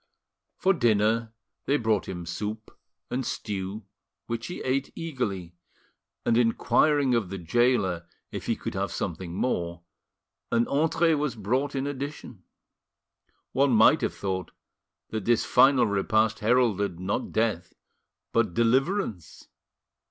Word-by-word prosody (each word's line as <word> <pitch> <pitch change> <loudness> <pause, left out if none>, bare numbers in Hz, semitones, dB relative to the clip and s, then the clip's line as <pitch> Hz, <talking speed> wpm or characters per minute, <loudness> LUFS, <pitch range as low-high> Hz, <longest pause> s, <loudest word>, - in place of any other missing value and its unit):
For, 195 - +3
dinner, 115 - +2 0.4
they 140 - +3
brought 110 -5 0
him 90 -2 -5
soup 105 +5 -5 0.4
and 130 +1 -1
stew, 100 -2 -4 0.4
which 115 0 -4
he 175 - -6
ate 135 +1 -1
eagerly, 105 - -4 0.7
and 115 - +3
inquiring 135 +4 +3
of 115 -6 +1
the 95 - -5
gaoler 95 -2 +1 0.2
if - - -6
he - - +1
could - - -5
have 95 +1 -2
something 85 -1 -4
more, 85 -7 -2 0.7
an 115 0 +2
entree 165 +3 +2
was 150 -3 -1
brought 130 +7 -1
in 135 0 -1
addition. 140 -7 -6 1.1
One 140 -1 +3
might 110 -1 +6
have - - -1
thought 95 -4 -3 0.6
that 110 -3 -3
this 120 -1 +3
final 135 -3 +5
repast 110 +1 +1
heralded, 105 -6 +2
not 95 +2 -2
death 110 -6 -1 0.6
but 110 -7 +1
deliverance. 125 - 0
115 Hz, 125 wpm, -27 LUFS, 95-130 Hz, 1.1 s, might